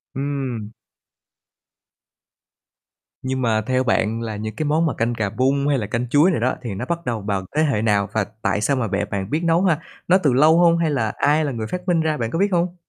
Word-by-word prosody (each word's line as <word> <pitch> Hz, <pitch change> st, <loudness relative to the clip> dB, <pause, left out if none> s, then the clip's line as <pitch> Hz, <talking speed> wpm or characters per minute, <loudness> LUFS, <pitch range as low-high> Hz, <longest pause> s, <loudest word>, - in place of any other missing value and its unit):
Ừm. 135 Hz, -6 st, -3 dB, 2.5 s
Nhưng 130 Hz, 0 st, -2 dB
mà 110 Hz, -3 st, +1 dB
theo 130 Hz, +3 st, 0 dB
bạn 115 Hz, -2 st, 0 dB
là 110 Hz, -2 st, -4 dB
những 110 Hz, +1 st, -5 dB
cái 155 Hz, -, -2 dB
món 155 Hz, +3 st, +2 dB
mà 155 Hz, -, 0 dB
canh 115 Hz, +1 st, 0 dB
cà 110 Hz, -3 st, -1 dB
bung, 135 Hz, +6 st, 0 dB
hay 145 Hz, -1 st, +2 dB
là 110 Hz, -5 st, -3 dB
canh 120 Hz, +2 st, -3 dB
chuối 150 Hz, +8 st, +4 dB
này 165 Hz, -, -1 dB
đó 125 Hz, +3 st, 0 dB
thì 120 Hz, -5 st, -5 dB
nó 105 Hz, -, -4 dB
bắt 170 Hz, 0 st, -2 dB
đầu 115 Hz, -3 st, -2 dB
vào 100 Hz, -2 st, -2 dB
thế 155 Hz, -, +3 dB
hệ 135 Hz, -9 st, +1 dB
nào 105 Hz, -3 st, +1 dB
và 110 Hz, -, +1 dB, 0.2 s
tại 105 Hz, -, 0 dB
sao 140 Hz, +6 st, +1 dB
mà 125 Hz, -4 st, -1 dB
bẹ 105 Hz, -, -1 dB
bạn 100 Hz, -1 st, -4 dB
biết 155 Hz, +6 st, -1 dB
nấu 170 Hz, +2 st, +2 dB
ha? 170 Hz, -5 st, +2 dB, 0.3 s
Nó 180 Hz, -, +5 dB
từ 140 Hz, -4 st, +3 dB
lâu 155 Hz, +5 st, +5 dB
hông, 170 Hz, -1 st, +5 dB
hay 165 Hz, -2 st, +1 dB
là 110 Hz, -6 st, -1 dB
ai 150 Hz, +2 st, +2 dB
là 145 Hz, -, -2 dB
người 110 Hz, -3 st, -4 dB
phát 180 Hz, -, -6 dB
minh 170 Hz, -2 st, +2 dB
ra, 155 Hz, -1 st, 0 dB
bạn 115 Hz, -2 st, -3 dB
có 165 Hz, -, -2 dB
biết 200 Hz, +1 st, +2 dB
hông? 175 Hz, 0 st, 0 dB
130 Hz, 240 wpm, -21 LUFS, 110-155 Hz, 2.5 s, Nó